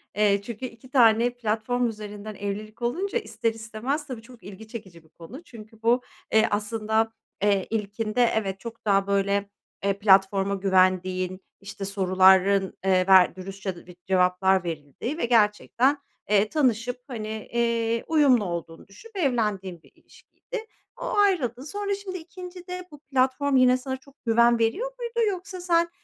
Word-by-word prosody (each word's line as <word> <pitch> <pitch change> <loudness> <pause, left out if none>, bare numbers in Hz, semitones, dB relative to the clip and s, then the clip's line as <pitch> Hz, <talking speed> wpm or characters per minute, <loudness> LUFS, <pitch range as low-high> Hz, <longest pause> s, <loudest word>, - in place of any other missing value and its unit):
Eee, 205 -1 +3
çünkü 235 +4 -6
2 245 +1 -11
tane 235 -3 +5
platform 240 +1 -1
üzerinden 210 -1 -7
evlilik 210 +3 -6
olunca, 365 - -1
ister 230 - -2
istemez, 225 +7 -4
tabii, 250 -5 -6
çok 240 +1 -16
ilgi 205 +2 -11
çekici 190 -8 -10
bir 160 - -25
konu. 185 - -12
Çünkü 220 -5 -14
bu, 240 +2 +3 0.3
eee, 220 0 +4
aslında, 220 +1 0 0.3
eee, 200 -2 +2
ilkinde, 215 +2 -2
evet, 195 -3 -2
çok 230 +1 -9
daha, 195 -1 +2
böyle, 200 0 +1 0.3
eee, 200 0 0
platforma 195 0 +4
güvendiğin, 185 -1 +1 0.2
işte, 195 0 -7
soruların, 190 0 +4
eee, 185 -1 +3
ver 185 -2 +6
dürüstçe 190 0 -6
ve 180 - -12
cevaplar 185 0 +3
verildiği 165 - -5
ve 335 - 0
gerçekten, 235 +4 +2 0.3
eee, 210 0 +3
tanışıp, 245 -4 0
hani, 225 -5 -5 0.3
eee, 230 -1 0
uyumlu 280 -9 +4
olduğunu 170 -1 -6
düşünüp 440 - -16
evlendiğin 210 - -1
bir - - -22
ilişkiydi. 465 -3 -10 0.4
O - - -2
ayrıldın. 320 - +2
Sonra, 405 +6 -3
şimdi, 390 -2 -6
2'ncide 360 +1 -9
bu 295 - -12
platform 270 0 +1
yine 255 -1 +5
sana 260 +1 -5
çok 275 +1 -21
güven 235 +1 +4
veriyor 395 - 0
muydu? 470 -1 -4
Yoksa 370 -1 -6
sen 340 -1 +2
220 Hz, 150 wpm, -25 LUFS, 195-260 Hz, 0.4 s, ver